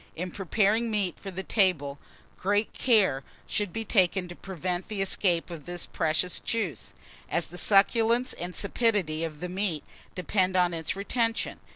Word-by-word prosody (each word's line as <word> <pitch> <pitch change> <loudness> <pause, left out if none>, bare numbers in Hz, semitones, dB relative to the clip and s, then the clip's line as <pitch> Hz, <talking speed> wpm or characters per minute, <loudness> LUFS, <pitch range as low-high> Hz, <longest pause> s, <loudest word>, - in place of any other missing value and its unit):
In 180 +2 -4
preparing 210 +5 +1
meat 205 -5 0
for 195 - -7
the 190 0 -5
table, 160 -10 +1 0.4
great 205 +3 0
care 195 - +3 0.2
should 205 -3 -1
be 225 +3 -4
taken 190 -3 +2
to 175 - -8
prevent 180 -1 -4
the 215 -2 -4
escape 185 -3 +1
of 165 -3 -9
this 175 -1 -3
precious 165 +2 0
juice, 195 - -3 0.3
as 170 - +2
the 175 - -9
succulence 230 +6 +3
and 175 +1 -6
sapidity 200 -7 +1
of 155 -2 -5
the 180 - -3
meat 180 -4 -1 0.3
depend 185 +1 0
on 180 -1 +3
its 160 0 -2
retention. 225 +3 -1
185 Hz, 160 wpm, -28 LUFS, 175-210 Hz, 0.4 s, care